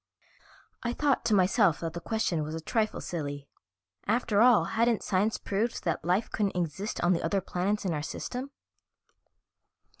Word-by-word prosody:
I 235 0 -2
thought 285 +1 +1
to 220 -3 +3
myself 190 -2 +3
that 165 -1 -3
the 170 - -4
question 200 -5 -1
was 155 +1 -4
a - - -3
trifle 215 +6 -1
silly; 145 -4 -5 0.6
after 220 -1 +2
all, 245 -2 +6
hadn't 230 -1 +1
science 205 +4 +1
proved 215 +4 -2
that 165 - -1
life 180 +6 0
couldn't 200 -3 -1
exist 175 +4 -3
on 175 +1 +4
the 170 - -1
other 200 - +1
planets 195 +3 -2
in 180 - 0
our 150 - -2
system? 250 - -5
195 Hz, 160 wpm, -29 LUFS, 170-225 Hz, 0.6 s, all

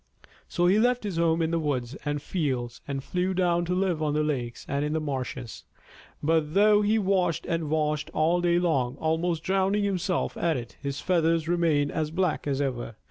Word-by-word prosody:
So 175 -3 0
he 190 +4 +4
left 245 +1 +2
his 200 -5 -3
home 165 0 +2
in 160 - 0
the 170 - +1
woods 135 -5 -2
and 145 0 -2
fields 125 -9 -2
and 135 -1 -3
flew 185 +3 -1
down 175 -1 +2
to 180 +1 -1
live 180 -4 0
on 150 -1 0
the 155 - +2
lakes 125 -6 -3
and 140 +1 -1
in 150 +1 -1
the 160 - +1
marshes. 130 -5 -5 0.6
But 155 +1 +1
though 210 +1 +5
he 210 +2 +2
washed 190 -5 +1
and 165 -3 -2
washed 150 -1 0
all 165 +3 +2
day 175 0 +3
long, 140 -8 +1
almost 160 +2 -1
drowning 195 +2 +1
himself 185 -3 -1
at 165 -4 0
it, 120 -1 -8
his 140 0 -4
feathers 165 -3 +1
remained 165 -4 +2
as 155 -2 -1
black 175 -2 -1
as 140 -1 0
ever. 125 -5 -3
160 Hz, 195 wpm, -27 LUFS, 145-180 Hz, 0.6 s, though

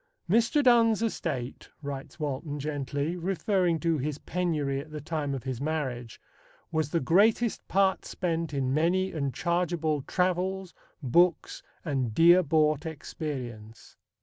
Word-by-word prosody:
"Mr. 230 - +3
Donne's 230 -3 +4
estate," 135 - -3
writes 140 +2 -6
Walton 145 0 -3
gently, 145 +2 -2
referring 180 -1 0
to 165 -3 +1
his 145 +2 -2
penury 150 -6 -1
at 150 +3 -8
the 155 0 -6
time 150 -2 -3
of 130 - -6
his 130 -2 -4
marriage, 135 -6 -3 0.5
"was 155 -3 0
the 165 - +1
greatest 210 - +2
part 190 0 +2
spent 165 -3 -2
in 135 -2 -1
many 180 +5 +1
and 140 -4 -2
chargeable 170 0 0
travels, 185 +3 -1 0.3
books, 170 +7 +2 0.2
and 130 -8 -1
dear 175 +2 +7
bought 155 -2 +2
experience." 125 -8 -7
155 Hz, 130 wpm, -28 LUFS, 140-180 Hz, 0.5 s, dear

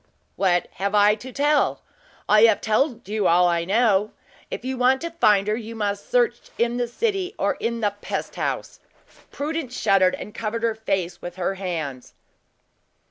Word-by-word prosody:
"What 180 -3 +1
have 200 +1 0
I 205 0 +6
to 245 +5 -8
tell? 290 +3 +1 0.4
I 215 +2 +6
have 220 -3 +4
told 235 +2 0
you 210 -1 0
all 175 +1 +5
I 170 -1 0
know. 210 0 +2 0.4
If - - -6
you 260 0 -2
want 255 +1 +3
to 335 0 -4
find 210 -11 +3
her, 210 - +1
you 230 0 -7
must 205 -2 -3
search - - +2 0.2
in 235 +1 +1
the 245 -1 0
city 390 - -2
or - - +1
in 235 0 -2
the 205 -2 +1
pest - - -4
house!" - - -3 0.5
Prudence 290 -4 -4
shuddered, 185 -2 +3
and 210 - -9
covered 230 +1 -4
her 230 -1 +2
face 190 -5 -3
with 175 0 -7
her 185 +1 -1
hands. 160 -9 -5
215 Hz, 175 wpm, -23 LUFS, 195-250 Hz, 0.5 s, I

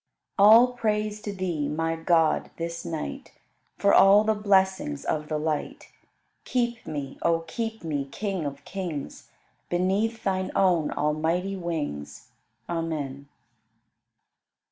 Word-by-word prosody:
33. 200 +1 +8
All 240 +3 +7
praise 215 -2 -1
to 210 - -4
Thee, 175 -7 -2
my 165 +2 -1
God, 165 -1 +2
this 170 0 -4
night 170 - -5 0.4
For 200 - +3
all 200 +2 +7
the 220 0 +2
blessings 190 - +1
of 150 -1 -1
the 155 - -1
light: 155 0 -3 0.5
Keep 240 -2 -1
me, 140 -3 -5
O 165 -1 +2
keep 225 +6 -5
me, 145 -4 -2
King 190 +4 -3
of 140 0 -8
kings, 175 -7 -6 0.4
Beneath 200 +6 0
Thine 190 -1 0
own 175 -5 +3
almighty 165 +6 0
wings. 150 - -5 0.4
Amen. 150 -5 -3
170 Hz, 120 wpm, -26 LUFS, 155-205 Hz, 0.5 s, 33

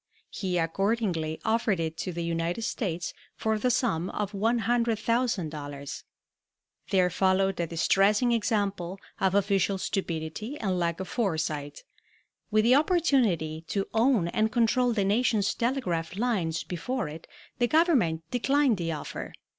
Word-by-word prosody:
He 185 -3 -2
accordingly 170 -2 0
offered 220 -4 +1
it 160 -1 -2
to 185 - -3
the 170 0 -4
United 170 +5 -2
States 175 -7 -2 0.2
for 220 -1 0
the 250 - +1
sum 225 -8 0
of 205 -2 -3
$100,000. 220 - -1 0.9
There 185 -2 +3
followed 190 +1 +2
a 170 - 0
distressing 195 +8 +3
example 200 -5 -1 0.2
of 190 0 +2
official 200 -1 +2
stupidity 190 - -3
and 190 -4 -1
lack 170 0 -1
of 190 - -4
foresight. 160 - -2 0.7
With 215 0 +3
the 240 +3 +5
opportunity 255 - +2
to 195 -1 -1
own 225 -5 +3
and 220 +4 +1
control 240 +2 +2
the 205 -4 +1
nation's 210 -1 +2
telegraph 185 -10 -1
lines 200 -9 0
before 220 +5 -3
it 155 +2 -9 0.3
the 240 - +3
Government 250 - +3
declined 270 -1 +2
the 165 -2 -2
offer. 150 - -6
195 Hz, 130 wpm, -28 LUFS, 170-230 Hz, 0.9 s, the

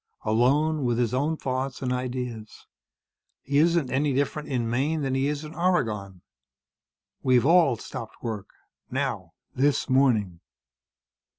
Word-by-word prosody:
Alone, 140 +7 +2
with 120 -2 +1
his 120 -2 0
own 150 +5 0
thoughts 130 0 -3
and 125 -1 0
ideas. 125 -3 -5 0.8
He 140 +2 +1
isn't 165 -3 +2
any 140 +1 +1
different 145 +2 -1
in 125 -4 -1
Maine 145 +6 0
than 135 -1 -1
he 135 +1 +1
is 145 +1 -2
in 155 +1 -8
Oregon. 110 - -1 1.0
We've 125 -1 +3
all 165 -5 +5
stopped 115 0 -8
work. 110 -5 -4 0.4
Now. - - -3 0.2
This 140 +2 +1
morning." 110 -10 +2
130 Hz, 130 wpm, -26 LUFS, 120-145 Hz, 1.0 s, all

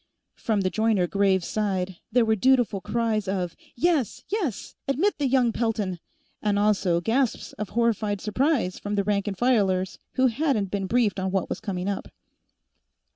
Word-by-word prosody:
From 215 -3 -1
the 185 -1 0
Joyner 220 -4 +2
Graves 190 -1 +2
side, 190 -4 -1
there 245 -2 +4
were 220 0 +3
dutiful 245 -3 +2
cries 225 -2 -1
of, 185 -3 -2 0.2
"Yes! 290 - +1
Yes! 360 - -2
Admit 310 +10 +1
the 285 - +2
young 250 -2 +3
Peltons!" 215 -6 -1 0.4
and 205 -1 +1
also 200 -4 +2
gasps 235 +5 0
of 210 -3 -3
horrified 215 -3 +1
surprise 230 - 0
from 205 0 -3
the 200 - +1
rank 200 0 0
and 195 -2 -3
filers 195 -7 +1
who 260 - +2
hadn't 240 -6 +1
been 195 -2 -2
briefed 220 -2 +1
on 190 0 -1
what 190 -1 -1
was - - -3
coming 190 -4 -3
up. 200 -1 -3
210 Hz, 165 wpm, -25 LUFS, 190-240 Hz, 0.4 s, there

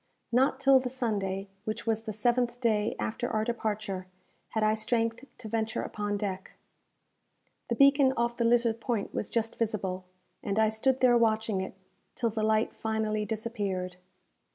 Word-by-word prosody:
Not 265 +2 +3
till 275 -1 +6
the 255 -1 -3
Sunday, 205 -6 -2 0.2
which 215 0 -4
was 220 -1 0
the 225 -1 -5
seventh 240 +3 +1
day 220 -3 +1
after 240 +2 -2
our 215 0 0
departure, 215 -5 -3 0.4
had 220 - -1
I 215 0 +4
strength 230 +2 0
to 245 - -8
venture 225 0 -1
upon 205 -1 -2
deck. 195 -2 -4 1.1
The 235 - 0
beacon 275 +1 +6
off 235 0 +1
the 235 - 0
Lizard 230 -1 +3
Point 230 -5 -2
was 210 - -2
just 225 -1 -1
visible, 190 -5 -2 0.4
and 200 0 -2
I 220 0 +4
stood 255 +4 +1
there 245 -2 +6
watching 220 -3 +1
it, 190 - -6 0.4
till 230 -2 0
the 215 0 -2
light 220 0 +2
finally 215 -1 -1
disappeared. 205 -5 -3
220 Hz, 160 wpm, -29 LUFS, 210-235 Hz, 1.1 s, till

